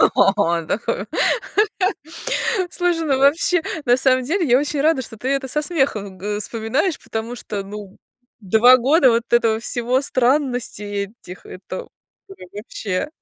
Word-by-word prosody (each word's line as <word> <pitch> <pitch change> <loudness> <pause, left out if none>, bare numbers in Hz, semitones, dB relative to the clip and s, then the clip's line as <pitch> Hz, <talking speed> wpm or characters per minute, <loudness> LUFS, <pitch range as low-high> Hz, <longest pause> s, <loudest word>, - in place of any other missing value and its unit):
О! 195 -4 +3 2.1
Слушай, 350 -2 0
ну, 270 -3 +2
вообще, 320 +5 +3 0.2
на 245 -1 +4
самом 255 -1 +2
деле 335 +6 0
я 245 +1 +5
очень 295 0 -2
рада, 300 -2 +2
что 225 - -9
ты 250 +5 -4
это 275 -1 -1
со 300 +4 -1
смехом 245 - -1
г 205 +3 -3
э, - - -4
вспоминаешь, 230 - -1
потому 225 +2 -5
что, 210 -4 -5
ну, 200 0 -9
э, - - -23 0.4
2 225 +5 +6
года 265 +2 +4
вот 230 0 +2
этого 225 -2 +3
всего, 240 +3 -1
странностей 245 -7 -1
этих, 180 +1 -11
это, 190 - -8 0.4
ой, 385 - -12
вообще. 205 +2 -4
245 Hz, 145 wpm, -20 LUFS, 210-280 Hz, 2.1 s, 2